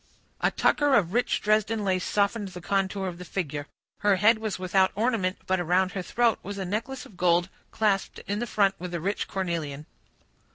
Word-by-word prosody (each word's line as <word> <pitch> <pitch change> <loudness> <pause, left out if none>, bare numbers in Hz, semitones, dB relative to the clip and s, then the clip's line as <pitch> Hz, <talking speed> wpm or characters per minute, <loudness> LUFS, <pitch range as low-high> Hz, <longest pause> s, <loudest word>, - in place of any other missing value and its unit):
A - - +4
tucker 290 -2 +3
of 185 -5 +2
rich 245 +1 +1
Dresden 215 0 +1
lace 185 -1 +1
softened 205 +1 0
the 180 -1 -8
contour 195 +1 -1
of 175 -1 -6
the - - -6
figure. 150 -5 -4 0.3
Her 205 -1 +3
head 215 +4 +4
was 220 -2 -3
without 190 +1 +2
ornament; 210 -4 0
but 185 0 +1
around 180 +2 +2
her 195 - -3
throat 230 +5 +1
was 200 +1 -6
a 195 - -3
necklace 230 +7 -3
of 200 - -15
gold 175 0 +3 0.2
clasped 205 -3 0
in 205 +3 -2
front 200 -3 +3
with 175 0 -5
a - - -1
rich 195 +5 -2
cornelian. 165 -6 -3
195 Hz, 190 wpm, -27 LUFS, 180-215 Hz, 0.3 s, A